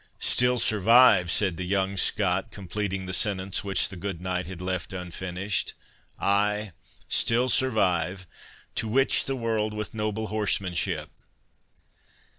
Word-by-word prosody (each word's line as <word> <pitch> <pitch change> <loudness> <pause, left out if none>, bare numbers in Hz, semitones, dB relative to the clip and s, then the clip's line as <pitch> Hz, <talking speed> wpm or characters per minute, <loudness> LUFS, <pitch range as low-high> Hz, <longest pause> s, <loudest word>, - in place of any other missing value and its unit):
"Still 125 0 +2
survive?" 110 -4 +5
said 95 -1 +1
the 90 - -4
young 95 +1 0
Scot, 95 -1 +1
completing 95 0 -4
the 95 - -5
sentence 95 0 -1
which 100 -1 +1
the - - -9
good 95 -1 -5
knight 90 -1 -3
had 90 -1 -8
left 90 0 -4
unfinished—"ay, 100 +3 -2 0.4
still 120 +2 +2
survive, 95 -8 +1 0.5
'To 110 - -2
witch 135 +5 +2
the 135 - -2
world 110 -3 -1
with 105 -2 -4
noble 110 0 -3
horsemanship. 100 -4 -1
100 Hz, 120 wpm, -26 LUFS, 90-110 Hz, 0.5 s, survive